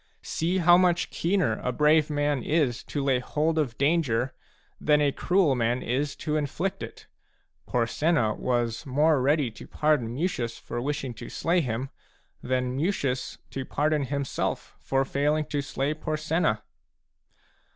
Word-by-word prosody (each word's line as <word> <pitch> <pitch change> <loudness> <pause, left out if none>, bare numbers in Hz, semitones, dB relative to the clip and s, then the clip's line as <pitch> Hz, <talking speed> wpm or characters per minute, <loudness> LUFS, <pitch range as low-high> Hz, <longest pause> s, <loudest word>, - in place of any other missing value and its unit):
See 175 +4 -1
how 175 0 +6
much 180 -1 +2
keener 170 - +1
a 125 - -1
brave 150 +3 +3
man 145 -2 0
is 145 -5 +1
to 145 - -3
lay 135 -2 +2
hold 155 +5 0
of 130 -7 -1
danger 135 -5 +1 0.5
than 150 0 +3
a 145 -1 +3
cruel 175 -1 +2
man 120 0 0
is 140 +4 -1
to 155 -1 +1
inflict 155 +6 -2
it: - - -8 0.6
Porsenna 120 0 +1
was 120 -2 -1
more 145 +2 +3
ready 140 -2 +2
to 110 - -12
pardon 150 -7 +1
Mucius 125 -7 -2
for 120 +1 -5
wish 145 +3 -2
ing 130 -3 -4
to 110 - -9
slay 175 +2 +1
him 125 0 -3 0.5
than 125 0 -1
Mucius 140 -5 -1
to 135 - -4
pardon 150 +1 0
himself 140 0 -3
for 135 0 0
failing 150 +3 +1
to 145 -1 -2
slay 140 +1 -2
Porsenna 155 -7 -1
145 Hz, 150 wpm, -27 LUFS, 125-155 Hz, 0.6 s, how